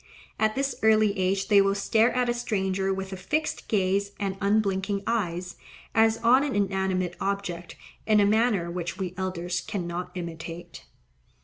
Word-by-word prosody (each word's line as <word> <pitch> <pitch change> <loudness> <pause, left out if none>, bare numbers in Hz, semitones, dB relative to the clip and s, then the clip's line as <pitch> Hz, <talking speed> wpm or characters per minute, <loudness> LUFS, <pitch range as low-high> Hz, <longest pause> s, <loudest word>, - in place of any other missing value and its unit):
At 215 0 +2
this 275 +1 0
early 215 -2 +4
age 195 0 0
they 205 -2 +6
will 195 0 +2
stare 220 +3 +3
at 250 -1 +2
a 240 - +2
stranger 195 -5 -1
with 190 0 -4
a - - -5
fixed 300 +12 -2
gaze 200 0 +1
and 195 -2 -2
un 200 +2 +3
blinking 195 -1 -1
eyes, 180 -6 -2 0.4
as 225 0 +4
on 255 +4 +5
an 290 -5 -2
inanimate 190 -3 0
object, 180 -3 -3 0.3
in 215 -1 +5
a 205 - +5
manner 210 -5 +2
which 175 +1 -4
we 185 -2 -4
elders 180 -1 -2
cannot 175 -3 -4
imitate. 170 -1 -7
195 Hz, 165 wpm, -26 LUFS, 185-215 Hz, 0.4 s, they